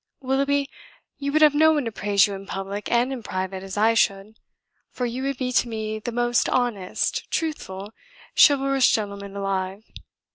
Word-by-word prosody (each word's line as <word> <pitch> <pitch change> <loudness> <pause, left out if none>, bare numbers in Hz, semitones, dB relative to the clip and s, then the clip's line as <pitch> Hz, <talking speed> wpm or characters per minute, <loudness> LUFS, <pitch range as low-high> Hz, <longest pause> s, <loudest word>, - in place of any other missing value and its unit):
Willoughby, 275 +1 0 0.5
you 280 0 -2
would 310 +1 +4
have 300 -1 +6
no 315 +2 +5
one 295 -4 0
to 230 - -3
praise 200 -1 +3
you 205 - -4
in 195 0 -8
public 195 +1 -5
and 245 +3 +2
in 255 - -6
private 185 -2 -4
as 195 +1 -7
I 220 +2 +4
should, 205 0 0 0.5
for 250 - -3
you 245 +2 -3
would 275 -1 -2
be 250 -1 -2
to 245 - +2
me 220 -1 -4
the 240 - -5
most 240 0 +1
honest, 230 -7 -1
truthful, 210 - -4 0.4
chivalrous 275 -2 +5
gentleman 200 -2 -2
alive. 195 0 -3
225 Hz, 175 wpm, -24 LUFS, 200-270 Hz, 0.5 s, have